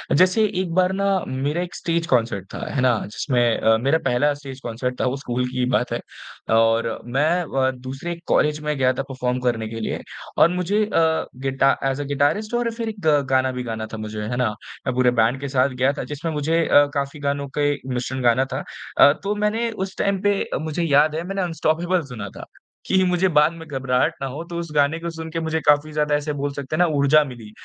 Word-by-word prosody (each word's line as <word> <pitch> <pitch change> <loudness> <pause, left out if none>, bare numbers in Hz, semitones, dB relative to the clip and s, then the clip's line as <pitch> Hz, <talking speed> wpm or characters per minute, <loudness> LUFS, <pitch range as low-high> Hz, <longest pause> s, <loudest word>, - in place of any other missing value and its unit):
जैसे 185 +6 +4 0.2
एक 170 -3 -3
बार 185 0 +3
ना 200 +1 -1 0.2
मेरा 145 +6 -1
एक 180 - -6
स्टेज 165 0 -1
कॉन्सर्ट 115 -6 +1
था। - - -5
है 135 - 0
ना? 125 -3 +3
जिसमें 120 +1 +1
अ, 110 0 +4
मेरा 140 +7 +2
पहला 145 +4 +2
स्टेज 135 -2 -9
कॉन्सर्ट 125 +2 -3
था - - +1
वो 130 +2 0
स्कूल 125 -2 -2
की 130 - -7
ही 125 - +2
बात 125 -1 +1
है। - - -1 0.6
और 115 0 +2
मैं 135 +6 +1
अ, 130 -3 0
दूसरे 135 +7 -6
कॉलेज 150 0 +2
में 150 0 -1
गया 130 -1 +3
था 135 - -3
परफॉर्म 125 -1 -2
करने 120 -3 -1
के 115 0 -6
लिए 110 - -3 0.4
और 165 - +6
मुझे 180 +4 0
अ, 210 - -10 0.5
गिटा 135 +1 +2
ऐज़ 135 +1 0
अ - - -4
गिटारिस्ट 145 - 0
और 240 -1 0
फिर 230 -1 -3
एक 215 -2 -8 0.3
गाना 130 0 +2
भी 125 0 -4
गाना 110 -2 -4
था - - -4
मुझे, 110 0 -5
है 110 +3 -3
ना? 125 -3 +2 0.4
मैं 130 - +1
पूरे 125 -1 +4
बैंड 120 +4 +2
के 140 - -3
साथ 130 0 +2
गया 135 - +4
था - - -3
जिसमें 160 +3 -3
मुझे 160 +3 +1
अ, 145 - +6
काफ़ी 140 +1 -3
गानों 140 0 -2
के 145 0 +2 0.2
मिश्रण 125 +1 -3
गाना 125 +2 +3
था। - - -3 0.3
अ, 145 - +8
तो 205 +1 -1
मैंने 210 +3 0
उस 190 -2 -5
टाइम 200 -1 0
पे 205 -1 +2
अ, - - -4
मुझे 160 +2 -2
याद 150 0 +4
है 165 - -2
मैंने 195 0 -2
अनस्टॉपेबल 175 +1 0
सुना 100 -4 -6
था - - -8 0.4
कि 190 0 +3
मुझे 180 +1 +2
बाद 150 +2 +5
में 165 -1 -10
घबराहट 130 -3 0
ना 135 - -1
हो 145 +6 -6
तो 170 - -4
उस 170 - -5
गाने 145 +3 +2
को 170 0 -4
सुनके 160 0 -5
मुझे 160 0 -1
काफ़ी 150 +1 +3
ज़्यादा 150 -1 +1
ऐसे 145 0 -2
बोल 145 0 -2
सकते 140 +1 -4
हैं 155 - -2
ना 180 - +6
ऊर्जा 140 +2 +5
मिली। 120 -6 -10
145 Hz, 230 wpm, -22 LUFS, 125-165 Hz, 0.6 s, अ